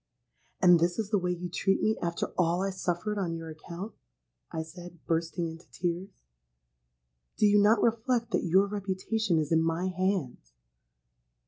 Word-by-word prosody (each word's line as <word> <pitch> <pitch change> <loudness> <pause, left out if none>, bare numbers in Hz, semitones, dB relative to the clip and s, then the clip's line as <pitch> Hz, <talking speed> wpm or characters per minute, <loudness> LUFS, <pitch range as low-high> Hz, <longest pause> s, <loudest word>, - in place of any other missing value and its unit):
'—'And 175 -2 +7
is 175 +1 +2
this 220 -3 -2
the 205 - +3
way 180 -1 -1
you 180 0 -2
treat 195 +3 +1
me 215 0 +2
after 170 -1 -2
all 175 +1 +2
I 195 - 0
suffered 185 +3 -2
on 170 -4 -1
your 165 -1 -6
account?' 170 +6 -8 0.6
I 160 -1 -3
said, 175 +2 -11
bursting 165 +1 -1
into 165 +1 -10
tears. 180 +3 -4 1.1
'Do - - +4
you 205 0 +6
not 215 +3 +4
reflect 235 +1 +1
that - - +1
your 190 +3 +4
reputation 200 -1 -1
is 155 -1 -1
in 160 0 +4
my 165 +3 0
hands?' 180 - -2
180 Hz, 160 wpm, -29 LUFS, 165-200 Hz, 1.1 s, And